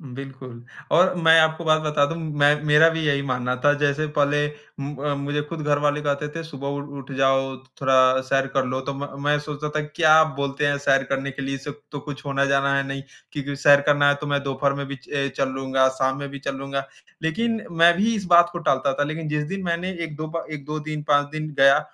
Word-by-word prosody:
बिल्कुल। 130 -3 -9 0.3
और 180 +3 +4
मैं 165 0 +7
आपको 160 +1 +2
बात 155 0 +3
बता 150 -2 +2
दूँ, 165 +3 -4
मैं 150 -2 +2
मेरा 150 +2 +6
भी 160 0 -2
यही 140 -1 +1
मानना 125 -2 -2
था 145 - +6
जैसे 145 +1 +1
पहले 145 0 +2 0.3
म 140 +1 -5
अ, 145 +1 -2
मुझे 145 +1 -2
खुद 165 -2 -5
घरवाले 145 0 +1
कहते 145 0 -1
थे 165 - -4
सुबह 140 -4 -7
उ 140 0 -3 0.2
उठ 135 +1 -11
जाओ, 135 0 +2
थो 130 - -20 0.2
थोड़ा 130 -1 +4
सैर 135 +1 0
कर 135 -1 +2
लो 130 +1 -2
तो 140 +1 -4
म 140 0 -7
मैं 145 0 +2
ये 150 - +1
सोचता 150 0 -5
था 155 +1 -2
क्या 160 -1 +6
बोलते 140 +1 -2
हैं 145 0 +1
सैर 135 -1 +2
करने 135 0 -2
के 140 - -7
लिए, 135 0 -3
इससे 135 +2 -7 0.2
तो 145 - -5
कुछ 145 0 -9
होना 140 0 +1
जाना 140 0 +2
है 140 - +1
नहीं। 135 0 -4 0.3
क्योंकि 145 -1 -4
सैर 140 +1 +5
करना 145 -1 +4
है, 145 - +3
तो 145 +1 -7
मैं 145 -1 0
दोपहर 140 0 0
में 140 0 -4
भी 140 0 -6 0.2
ए 140 -1 0
चल 135 -1 +1
लूँगा, 130 0 +1
शाम 130 0 -1
में 140 - -5
भी 140 0 -8
चल 140 0 -4
लूँगा, 135 0 -4 0.4
लेकिन 225 +7 -1
मैं 170 +1 +5
भी 225 +4 +1
इस 200 -3 -4
बात 175 -1 +6
को 175 - -4
टालता 135 -4 +1
था - - +3
लेकिन 155 +2 -4
जिस 150 0 -1
दिन 195 +3 -5
मैंने 170 +2 -1
1-2 155 -1 -6
बा 165 +1 -5
1-2 150 +1 -5
दिन, 155 0 -5
5 145 -1 +2
दिन 155 0 -4
गया 135 +1 +6
145 Hz, 240 wpm, -23 LUFS, 135-155 Hz, 0.4 s, मैं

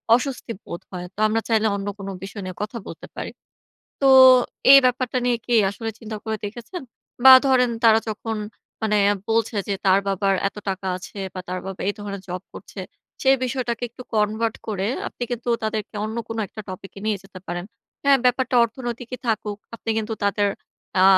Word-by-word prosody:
অস্বস্তি 250 -2 -3
বোধ 170 - -6
হয়। 180 -1 -5
তো - - -11
আমরা 225 +1 +1
চাইলে 220 -1 +3
অন্য 200 0 -4
কোন 195 -1 -7 0.2
বিষয় 200 +1 -7
নিয়ে 185 -1 -6
কথা 215 +3 -4
বলতে - - -9
পারি।" - - -4 0.7
তো 270 - +6 0.6
এই 275 - +12
ব্যাপারটা 255 0 +1
নিয়ে 245 -1 +2
কি 240 - +1 0.2
আসলে 225 +2 -5
চিন্তা 220 -1 -6
করে 220 0 -2
দেখেছেন? 240 - -6 0.4
বা, 265 - +12
ধরেন 250 -2 +4
তারা 220 -1 +7
যখন 220 +1 -3 0.5
মানে 210 -1 +2 0.3
বলছে 225 0 +1
যে, 200 - +1
"তার 190 +1 +5
বাবার 195 0 +2
এত - - -19
টাকা 190 0 -3
আছে 185 +2 -10 0.2
বা, 185 - -4
তার 185 0 -3
বাবা 195 -1 -6
এই 205 - +2
ধরনের 200 -2 -6
জব 180 +1 -4
করছে।" - - -9 0.4
সেই 270 0 +5
বিষয়টাকে 245 -2 -2
একটু 250 - -10
কনভার্ট 215 +1 +1
করে 200 -2 -1 0.2
আপনি - - -11
কিন্তু 240 0 -4
তাদেরকে 215 0 -3
অন্য 220 +1 -4
কোন 225 - -4
একটা 215 - -9
টপিকে 190 +1 -8
নিয়ে 215 - +1
যেতে 195 -1 -12
পারেন। 175 +1 -4 0.4
হ্যাঁ, 280 -1 +6
ব্যাপারটা 250 +1 +2
অর্থনৈতিকই 240 +1 -5
থাকুক। 215 -2 -1 0.2
আপনি 230 0 -4
কিন্তু 220 0 -3
তাদের 205 0 +2 0.5
আ - - +7
220 Hz, 180 wpm, -23 LUFS, 200-240 Hz, 0.7 s, এই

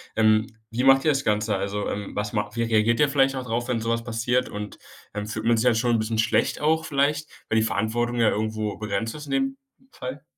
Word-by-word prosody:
Ähm, 110 0 +4 0.2
wie 125 +3 -1
macht 135 0 +6
ihr 155 - +4
das 135 -1 -1
Ganze? 105 0 +1
Also, 100 +1 -2
ähm, 100 0 -5
was 105 0 -2
macht 105 0 -2
wie 115 - 0
reagiert 115 0 +2
ihr 145 - +4
vielleicht 135 -1 +3
dadrauf, 120 -1 -2
wenn 120 -3 -1
so 115 - -2
was 115 0 -1
passiert? 120 +2 0
Und, 105 0 -7 0.4
ähm, 105 0 -4
fühlt 110 +1 -4
man 115 -1 +4
sich 115 - 0
halt 120 -3 +4
schon 120 +1 +1
'n - - +1
bisschen 110 +1 -2
schlecht 115 - +1
auch 160 +1 +2
vielleicht, 145 +1 +1 0.2
wenn 110 - +2
die 110 - +4
Verantwortung 120 +3 -1
ja 110 - +5
irgendwo 110 0 -2
begrenzt 105 +3 -3
ist 150 0 -8
in - - -8
dem 270 0 0 0.3
Fall? 130 +3 -7
115 Hz, 235 wpm, -25 LUFS, 110-130 Hz, 0.4 s, macht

